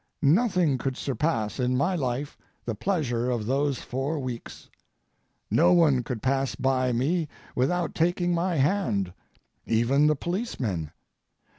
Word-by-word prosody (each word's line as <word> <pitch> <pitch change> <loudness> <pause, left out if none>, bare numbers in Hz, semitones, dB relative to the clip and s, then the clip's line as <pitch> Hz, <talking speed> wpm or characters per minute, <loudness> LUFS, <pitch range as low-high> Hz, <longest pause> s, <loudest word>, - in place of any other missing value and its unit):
Nothing 170 - +3
could 135 0 -2
surpass 130 -4 -1
in 125 0 +1
my 175 +8 +1
life 135 -1 -2 0.3
the 115 - -2
pleasure 125 - -1
of 120 -4 -1
those 140 +2 0
four 135 +5 -2
weeks. 125 -4 -6 0.8
No 175 +3 +5
one 155 -7 +4
could 120 -2 -5
pass 135 0 0
by 130 -1 +1
me 150 +8 0 0.3
without 170 +8 0
taking 175 +1 +1
my 175 +1 0
hand, 130 - +1 0.5
even 125 +6 +3
the 150 - +3
policemen. 135 - -3
135 Hz, 130 wpm, -26 LUFS, 125-170 Hz, 0.8 s, No